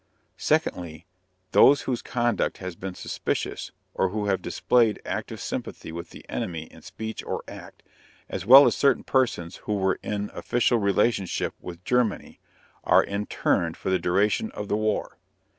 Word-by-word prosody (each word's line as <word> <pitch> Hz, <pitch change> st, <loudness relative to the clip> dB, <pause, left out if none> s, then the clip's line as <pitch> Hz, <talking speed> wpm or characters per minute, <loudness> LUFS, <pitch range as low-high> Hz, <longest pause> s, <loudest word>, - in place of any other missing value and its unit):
Secondly, 85 Hz, -1 st, -1 dB, 0.5 s
those 140 Hz, +1 st, +6 dB
whose 125 Hz, -3 st, -2 dB
conduct 120 Hz, -2 st, 0 dB
has 90 Hz, -2 st, -6 dB
been 95 Hz, 0 st, -6 dB
suspicious, -, -, -3 dB, 0.2 s
or 95 Hz, -, +1 dB
who 105 Hz, +2 st, -2 dB
have 95 Hz, -2 st, 0 dB
displayed 115 Hz, -4 st, +2 dB
active -, -, -4 dB
sympathy -, -, -5 dB
with 85 Hz, +1 st, -7 dB
the -, -, -13 dB
enemy 80 Hz, -3 st, -4 dB
in 80 Hz, -, -16 dB
speech 100 Hz, +5 st, -7 dB
or -, -, -4 dB
act, -, -, -11 dB, 0.4 s
as -, -, -5 dB
well 135 Hz, +7 st, +10 dB
as -, -, +3 dB
certain 140 Hz, -3 st, +3 dB
persons 115 Hz, -10 st, 0 dB
who 105 Hz, -, -3 dB
were 95 Hz, -1 st, +1 dB
in 105 Hz, -1 st, -3 dB
official 120 Hz, 0 st, +1 dB
relationship 100 Hz, -1 st, +1 dB
with 90 Hz, 0 st, -9 dB
Germany, 125 Hz, -3 st, 0 dB, 0.4 s
are -, -, +5 dB
interned 100 Hz, -4 st, -1 dB
for 95 Hz, -, -3 dB
the 95 Hz, -, +2 dB
duration 100 Hz, -, +1 dB
of 105 Hz, -, -6 dB
the -, -, +2 dB
war. 110 Hz, -2 st, -1 dB
100 Hz, 155 wpm, -25 LUFS, 90-120 Hz, 0.5 s, well